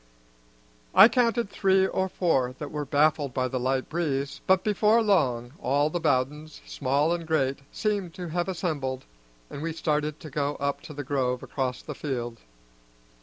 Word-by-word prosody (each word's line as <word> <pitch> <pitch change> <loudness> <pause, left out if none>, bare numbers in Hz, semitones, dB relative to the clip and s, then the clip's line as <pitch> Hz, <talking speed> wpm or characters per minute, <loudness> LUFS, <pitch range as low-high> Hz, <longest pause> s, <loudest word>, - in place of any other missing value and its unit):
I - - +10
counted 235 -3 +1
three 190 -1 +3
or 190 0 -1
four 135 -10 0
that 150 - -6
were 150 -1 -3
baffled 145 -1 +2
by 130 -1 +1
the 130 0 -3
light 130 +1 0
breeze, 145 -4 -2
but 190 0 +4
before 215 +2 +3
long 125 - +1
all 145 +3 +1
the 175 - -2
Bowdens, 150 +1 -1
small 145 +4 +1
and 170 -2 -4
great, 140 -4 +1
seemed 200 -6 -2
to 180 -2 -6
have 175 +3 -1
assembled, 145 -8 -3 0.5
and 140 - -6
we 165 +1 -3
started 150 -1 -1
to 155 -3 -9
go 145 +1 -1
up 140 0 -2
to - - -7
the 145 - -4
grove 130 -2 -1
across 130 -2 -3
the - - -6
field. 120 -5 -4
150 Hz, 170 wpm, -27 LUFS, 135-175 Hz, 0.5 s, I